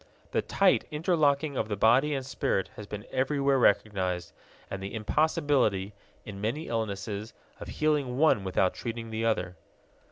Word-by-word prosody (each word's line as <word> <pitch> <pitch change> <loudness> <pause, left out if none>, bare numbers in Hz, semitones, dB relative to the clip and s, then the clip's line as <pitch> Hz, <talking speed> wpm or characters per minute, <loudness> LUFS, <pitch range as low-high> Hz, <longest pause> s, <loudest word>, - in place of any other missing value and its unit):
The - - +1
tight - - +2
interlocking 150 -3 +1
of - - -1
the 105 - -2
body 125 +8 +4
and 135 -1 -3
spirit 95 -7 -1
has 105 - -9
been 105 0 -7
everywhere 135 +1 +1
recognized, 95 -6 +1 0.3
and 95 - -6
the 100 +3 -5
impossibility, 130 - +1 0.3
in 100 -2 -8
many 130 +10 -2
illnesses, 105 -1 -3 0.2
of - - -8
healing 145 -5 0
one 145 -9 +4
without 95 0 +1
treating 115 -1 -5
the 110 +1 -2
other. 95 -5 -1
115 Hz, 150 wpm, -28 LUFS, 100-140 Hz, 0.3 s, body